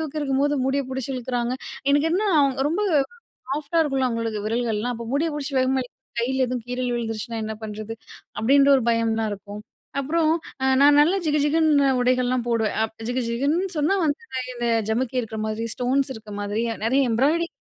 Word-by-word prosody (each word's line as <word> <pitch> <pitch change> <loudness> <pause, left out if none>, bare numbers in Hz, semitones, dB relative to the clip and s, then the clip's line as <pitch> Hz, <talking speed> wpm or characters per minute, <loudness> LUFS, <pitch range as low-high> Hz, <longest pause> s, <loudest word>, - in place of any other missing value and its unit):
தூக்கியிருக்கும்போது 290 -2 0
முடிய 275 +1 +1
புடிச்சு 265 0 -3
இழுக்கிறாங்க. 245 0 -2 0.4
எனக்கு 290 +3 +3
என்ன 405 +4 +1 0.4
ரொம்ப 345 +6 -1 0.7
சாஃப்ட்டா 300 +4 0
இருக்கும்ல 270 -4 0
அவங்களுக்கு, 230 -3 -2
விரல்கள்லாம். 230 +1 -1
அப்ப 235 0 -7
முடிய 310 +4 +1
புடிச்சி 285 -1 -4
வேகமா 260 0 +2
இழுக் 235 - -14
கைல 260 +1 +1
எதுவும் 250 -2 -4
கீறல் 250 0 -2
விழுந்துருச்சுனா 230 -1 -3
என்ன 220 0 -4
பண்ணுறது. 215 +1 -6 0.4
அப்படின்ற 275 +4 +5
ஒரு 255 - -1
பயம்லாம் 225 -1 +1
இருக்கும். 205 +1 -9 0.4
அப்புறம் 315 +3 +1 0.3
அ - - +2 0.2
நான் 290 0 +7
நல்லா 345 +6 +3
ஜிகுஜிகுன்னு 295 -1 +3
உடைகள்லாம் 250 0 +1
போடுவேன். 225 -2 0
அப் 220 - -6
ஜிகு 250 +1 -1
ஜிகுன்னு 290 +10 +1
சொன்னா 300 +7 +2
வந்து 290 -1 0 0.3
இந்த 240 0 -3 0.2
ஜமுக்கி 255 +3 -1
இருக்குற 220 -2 -5
மாதிரி, 215 +1 -3
ஸ்டோன்ஸ் 265 +2 0
இருக்க 215 -1 -11
மாதிரி, 205 +2 -2 0.2
நிறைய 260 +5 +3
எம்ப்ராய்டரிங் 305 +9 +1
255 Hz, 160 wpm, -24 LUFS, 230-285 Hz, 0.7 s, நான்